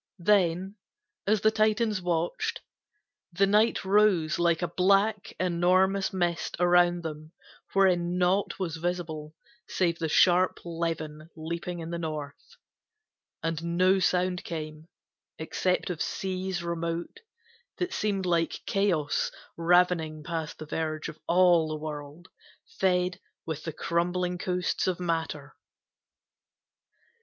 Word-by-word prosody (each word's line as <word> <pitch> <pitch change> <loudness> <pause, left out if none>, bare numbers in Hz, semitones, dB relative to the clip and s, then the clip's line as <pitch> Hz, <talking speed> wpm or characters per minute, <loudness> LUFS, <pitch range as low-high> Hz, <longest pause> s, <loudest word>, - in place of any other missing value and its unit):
Then, 190 +1 +2 0.5
as 210 0 +3
the 220 - +4
Titans 215 -1 +1
watched, 175 - -1 0.7
The 195 +3 +3
night 210 +1 +2
rose 190 -6 +3
like 170 0 +2
a - - +1
black, 195 +4 +2
enormous 185 +3 +2
mist 175 -3 -1
Around 175 0 +4
them, 155 0 -7 0.4
wherein 180 -2 +3
naught 185 +2 +1
was 170 -4 -3
visible 160 -3 -4 0.3
Save 170 -2 0
the 160 -1 -1
sharp 180 +3 +4
levin 165 -2 -4
leaping 170 +2 -5
in 165 +1 -6
the 170 - -3
north; 150 -3 -6 0.9
And 165 0 -2
no 185 +1 +4
sound 180 0 +1
came, 155 -1 -6 0.5
except 180 +3 -1
of 165 -3 -5
seas 185 -1 -3
remote, 170 - -3 0.6
That 360 +1 -2
seemed 200 -3 -1
like 170 -2 0
Chaos 180 -8 +1 0.3
ravening 170 -2 +2
past 160 -1 -4
the 155 - -8
verge 155 0 -3
Of - - -11
all 175 -2 +5
the 155 0 -3
world, 150 +1 -7 0.5
fed 180 -1 +1 0.3
with 155 -1 -5
the 165 - -2
crumbling 175 +2 -1
coasts 180 0 -1
Of 180 -1 0
Matter. 160 -5 -3
175 Hz, 120 wpm, -28 LUFS, 160-185 Hz, 0.9 s, all